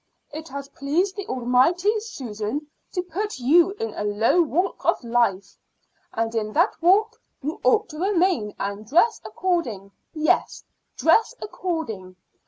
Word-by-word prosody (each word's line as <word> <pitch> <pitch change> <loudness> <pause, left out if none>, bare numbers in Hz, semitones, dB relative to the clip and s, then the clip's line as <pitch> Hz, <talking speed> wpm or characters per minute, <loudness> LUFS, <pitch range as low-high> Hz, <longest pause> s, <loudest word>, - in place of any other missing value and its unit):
It 310 +2 -7
has 280 -1 -7
pleased 320 +8 -1
the 405 - -6
Almighty, 265 - +2
Susan, 260 - -5 0.3
to 360 - -1
put 390 +3 -4
you 320 +8 +4
in 225 - -4
a - - -4
low 210 +11 +3
walk 345 +4 -1
of - - +1
life, 230 -5 0 0.5
and 225 0 -2
in 215 -2 -2
that 345 +7 +3
walk 430 +7 +3 0.2
you 300 +3 -4
ought 435 -1 +3
to 305 -1 -9
remain, 360 - +1
and 200 +2 -4
dress 350 - +3
according 245 - -2 0.2
yes, 310 0 +1 0.3
dress 440 +9 +3
according. 235 - -4
310 Hz, 140 wpm, -24 LUFS, 225-370 Hz, 0.5 s, you